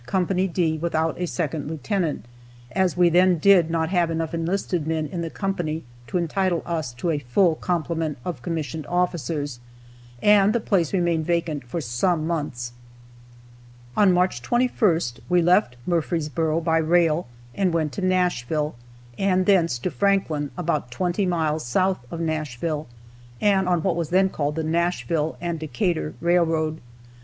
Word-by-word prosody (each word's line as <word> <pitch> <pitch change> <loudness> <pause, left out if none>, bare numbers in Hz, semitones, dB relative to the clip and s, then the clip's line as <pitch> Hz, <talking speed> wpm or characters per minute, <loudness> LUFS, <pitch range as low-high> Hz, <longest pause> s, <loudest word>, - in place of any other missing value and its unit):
D 160 -3 0
without 160 -1 0
a 180 - 0
second 155 -4 -3
lieutenant, 160 - -2 0.5
as 185 -2 +1
we 175 -1 +5
then 180 +1 +4
did 175 -1 +5
not 165 -1 0
have 175 -3 +2
enough 165 0 -2
enlisted 170 -1 -1
men 160 -1 0
in 170 +3 -4
the 165 - -3
company 170 -5 -3 0.2
to 150 - -1
entitle 175 +1 0
us 160 -7 -2
to 165 +8 -2
a 150 - 0
full 150 +7 +2
complement 165 -2 -2
of 180 - -4
commissioned 160 -3 -4
officers, 160 -6 -1 0.6
and 205 - +5
the 235 - +2
place 185 -7 +1
remained 170 -4 +1
vacant 170 -4 -1
for 120 +8 -4
some 155 +6 0
months. 145 -7 -3 1.2
On 200 -3 +5
March 180 -8 +1
21st, 175 - +1
we 180 0 +4
left 180 -6 +3
Murfreesboro 165 -1 0
by 165 -1 +2
rail 165 -1 +2 0.3
and 190 -3 +1
went 160 -3 0
to 195 - -5
Nashville, 170 -6 0 0.5
and 185 -1 +2
thence 170 -9 +3
to 175 +9 -3
Franklin, 185 -8 +1
about 155 -7 -1
twenty 180 - -1
miles 160 -3 0
south 185 +10 +1
of 165 - -6
Nashville, 155 -1 -2 0.5
and 195 -3 +2
on 175 -3 +1
what 190 -3 +1
was 170 -3 -2
then 190 +2 +3
called 150 -4 -2
the 160 - -2
Nashville 165 -1 0
and 170 -1 -3
Decatur 155 +2 -2
railroad. 165 -2 +1
165 Hz, 150 wpm, -24 LUFS, 155-180 Hz, 1.2 s, we